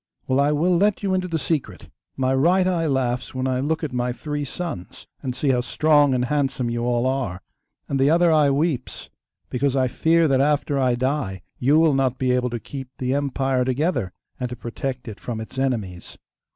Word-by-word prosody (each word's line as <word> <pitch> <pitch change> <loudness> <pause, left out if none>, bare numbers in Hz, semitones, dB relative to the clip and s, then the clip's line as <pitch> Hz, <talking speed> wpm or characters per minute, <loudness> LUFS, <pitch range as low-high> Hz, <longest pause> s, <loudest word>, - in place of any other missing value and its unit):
Well, 130 +1 +1
I 145 +1 +3
will 170 +5 +2
let 205 +2 +2
you 195 -1 +1
into 185 -1 0
the 165 -2 -1
secret. 130 - -3 0.3
My 130 0 +1
right 175 +8 +3
eye 170 -3 +1
laughs 130 -3 -1
when 130 0 -1
I 130 -1 0
look 155 +4 -1
at 145 -4 -3
my 125 0 0
three 145 +3 -4
sons, 140 - -6 0.2
and 125 -2 -4
see 145 - 0
how 125 -2 +3
strong 145 +1 +3
and 125 0 +1
handsome 135 -3 -1
you 120 0 -2
all 120 0 +1
are, 130 -9 -1 0.5
and 140 - -1
the 135 +2 +4
other 170 +1 +4
eye 150 -2 +4
weeps 140 -2 -2 0.4
because 135 +1 0
I 130 -1 +2
fear 165 +5 +3
that 135 -2 +3
after 145 -1 +1
I 125 -2 +2
die 125 -7 -2 0.2
you 140 +5 +4
will 160 -2 +4
not 135 -2 +1
be 130 -1 +1
able 125 0 +1
to 120 0 -4
keep 135 +3 -8
the 130 0 -1
empire 135 -2 0
together, 130 - 0 0.3
and 125 -1 -2
to 125 - -5
protect 125 +2 -5
it 105 -2 -7
from 115 -3 -5
its 110 +4 -7
enemies. 110 -10 -3
135 Hz, 205 wpm, -23 LUFS, 125-150 Hz, 0.5 s, the